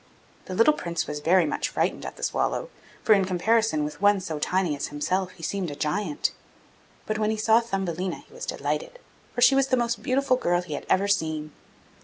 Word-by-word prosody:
The 185 - -5
little 230 +9 +5
Prince 170 - -3
was 150 0 -4
very 170 +3 +4
much 150 - -1
frightened - - -1
at - - -8
the - - -9
swallow, - - -1 0.3
for 220 - +6
in 195 -2 +4
comparison 190 -1 +1
with 150 +3 -6
one 205 -1 +5
so 160 -5 -5
tiny 180 0 0
as 140 - -3
himself 180 +6 -1
he 175 -3 -14
seemed 190 0 -2
a 145 - -6
giant. 150 +2 -1 0.7
But 215 0 -2
when 215 0 +1
he 220 - -1
saw 220 +1 +4
Thumbelina, 190 -5 -3
he - - -20
was 485 - -7
delighted, - - -3 0.4
for 245 - -1
she 270 - +7
was 270 0 +3
the 255 - +2
most 235 -1 -1
beautiful 260 -1 +2
girl 175 -6 +1
he 165 -4 -7
had 145 - -6
ever 195 +2 +3
seen. 160 -5 -1
190 Hz, 210 wpm, -26 LUFS, 160-230 Hz, 0.7 s, she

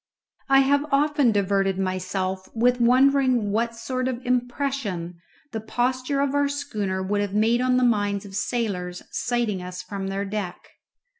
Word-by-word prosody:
I 270 0 +7
have 285 +2 +2
often 290 -2 +3
diverted 195 -2 +1
myself 185 0 -2
with 245 +2 +2
wondering 255 -2 +4
what 230 +2 0
sort 255 +2 -3
of 255 -1 -4
impression 245 -8 -2 0.3
the 220 - -4
posture 255 +5 -1
of 280 -1 0
our 285 0 +2
schooner 210 -10 -3
would 205 +2 0
have 205 -1 -3
made 225 +3 +3
on 255 0 +2
the 255 - +2
minds 205 -4 +1
of 195 -1 -9
sailors 195 -6 -2
sighting 235 -6 -1
us 180 0 -7
from 195 -1 -5
their 195 +1 -2
deck. 195 -3 -5
230 Hz, 155 wpm, -24 LUFS, 195-255 Hz, 0.3 s, I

